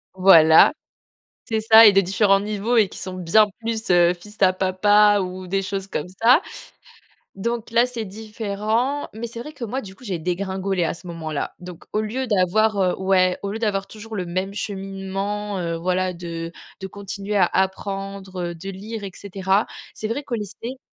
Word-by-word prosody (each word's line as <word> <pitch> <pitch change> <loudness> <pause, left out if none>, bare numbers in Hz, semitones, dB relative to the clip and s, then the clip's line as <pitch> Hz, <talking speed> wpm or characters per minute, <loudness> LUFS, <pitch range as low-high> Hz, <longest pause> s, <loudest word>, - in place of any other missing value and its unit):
Voilà. 165 - +7 0.7
C'est 220 -1 -1
ça 225 +1 +8
et 210 - +9
de 195 - +4
différents 195 +1 +3
niveaux 210 +3 -1
et 215 -3 +5
qui - - -12
sont 185 0 -6
bien 185 +4 +4
plus, 225 -1 -4
heu, 175 0 +5
fils 210 +4 -12
à 185 -1 +5
papa 205 +3 +4
ou 185 0 -6
des 195 +2 0
choses 195 0 -4
comme 155 -4 -4
ça. 250 +8 +6 0.9
Donc 235 +4 -3
là, 235 +1 +4
c'est 240 -3 -5
différent, 215 +6 -2
mais 225 +2 -5
c'est 235 0 -8
vrai 300 +6 -8
que 285 - -8
moi 250 +4 -3
du 190 -4 -11
coup 250 - -18
j'ai 190 -7 -3
dégringolé 190 +2 -2
à 165 - -1
ce 175 - -14
moment-là. 160 -3 -4
Donc 180 -2 -10
au 215 - +1
lieu 235 +5 -3
d'avoir 210 +1 +2
heu, 180 -1 +2
ouais, 185 -1 +2
au 200 - -3
lieu 220 - -4
d'avoir 200 -3 -1
toujours 220 +1 -9
le 185 -3 -3
même 185 +3 -3
cheminement, 195 +1 -4
heu, 170 -1 -2
voilà 185 +2 -1
de 170 -1 -6 0.3
de 190 - -4
continuer 200 +1 -6
à 190 -3 +5
apprendre, 195 0 -3
heu, - - -8
de 185 +4 -8
lire 205 +3 -7
et 195 - -6
cetera. 195 +1 0 0.3
C'est 215 - -5
vrai 245 +7 -3
qu'au 250 - -3
lycée 225 +4 -6
195 Hz, 190 wpm, -22 LUFS, 185-215 Hz, 0.9 s, et